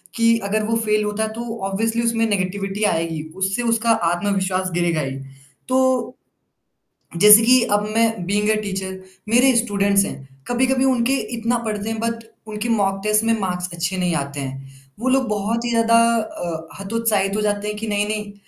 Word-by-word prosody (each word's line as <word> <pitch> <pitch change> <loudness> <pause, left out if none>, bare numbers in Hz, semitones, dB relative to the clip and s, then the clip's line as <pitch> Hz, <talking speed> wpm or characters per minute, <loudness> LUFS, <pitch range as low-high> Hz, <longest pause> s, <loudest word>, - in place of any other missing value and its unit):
कि 230 0 +3
अगर 215 +2 0
वो 225 +1 0
फ़ेल 215 0 +2
होता 210 +1 -2
है 220 - -2
तो 230 0 -6
ऑब्वियसली 225 +4 -1
उसमें 230 -1 +1
नेगेटिविटी 195 +1 -2
आएगी, 165 -5 0
उससे 195 +5 -1
उसका 230 0 0 0.2
आत्मविश्वास 190 0 -1
गिरेगा 170 -2 0
ही। 135 -1 -4 0.5
तो 260 -1 +1 1.0
जैसे 210 +4 +9
कि 255 0 +6
अब 205 0 +1
मैं 225 -5 +1
बीइंग 205 +2 0
अ 215 - +3
टीचर, 190 -2 -5 0.3
मेरे 250 +2 +4
स्टूडेंट्स 200 -3 +2
हैं, 135 -1 -8 0.2
कभी-कभी 260 +2 +1
उनके 260 0 +2 0.2
इतना 235 +2 0
पढ़ने 215 +1 -3
के 220 - -6
बाद, 230 0 -3 0.2
उनके 215 +2 -4
मॉक 195 -3 +1
टेस्ट 215 +1 +2
में 230 0 +2
मार्क्स 180 -2 -3
अच्छे 170 +3 -2
नहीं 180 -2 0
आते 140 -1 -4
हैं। 135 0 -7 0.3
वो 260 +2 -1
लोग 260 -1 +2
बहुत 215 +3 -1
ही - - -1
ज़्यादा 230 0 +3 0.2
अ, 170 -7 -4
हतोत्साहित 205 -1 0
हो 215 - -1
जाते 205 0 -1
हैं 210 - -3
कि 220 +1 -5
नहीं, 205 0 0
नहीं 210 -1 -4
210 Hz, 180 wpm, -21 LUFS, 190-230 Hz, 1.0 s, जैसे